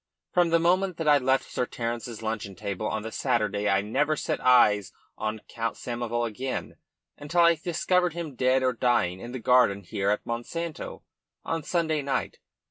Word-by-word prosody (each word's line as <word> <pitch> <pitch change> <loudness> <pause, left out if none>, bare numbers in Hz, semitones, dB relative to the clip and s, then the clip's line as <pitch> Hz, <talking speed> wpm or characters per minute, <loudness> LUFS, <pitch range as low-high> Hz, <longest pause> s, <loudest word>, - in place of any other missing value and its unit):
From 175 -1 +4
the 165 - +4
moment 180 +1 +2
that 160 - -3
I 145 -1 +6
left 130 +1 +2
Sir 125 - -1
Terence's 115 -1 -4
luncheon 105 -3 -3
table 100 +3 -4
on 105 0 -2
the 110 - -6
Saturday 105 -6 0
I 95 0 +3
never 140 +9 0
set - - -2
eyes 105 -6 +5 0.2
on 110 0 -3
Count 115 0 -3
Samoval 120 0 -2
again 130 +4 -5 0.4
until 160 +4 +1
I 170 0 +7
discovered 175 +2 0
him 165 -4 -5
dead 130 +1 +2
or 130 -1 +2
dying 115 -7 +1
in 120 +4 -8
the 130 - -4
garden 120 -5 +3
here 95 +3 -2
at 105 - 0
Monsanto 155 +8 -5 0.4
on 165 0 -1
Sunday 160 -2 0
night. 140 -1 -2
125 Hz, 175 wpm, -27 LUFS, 110-155 Hz, 0.4 s, I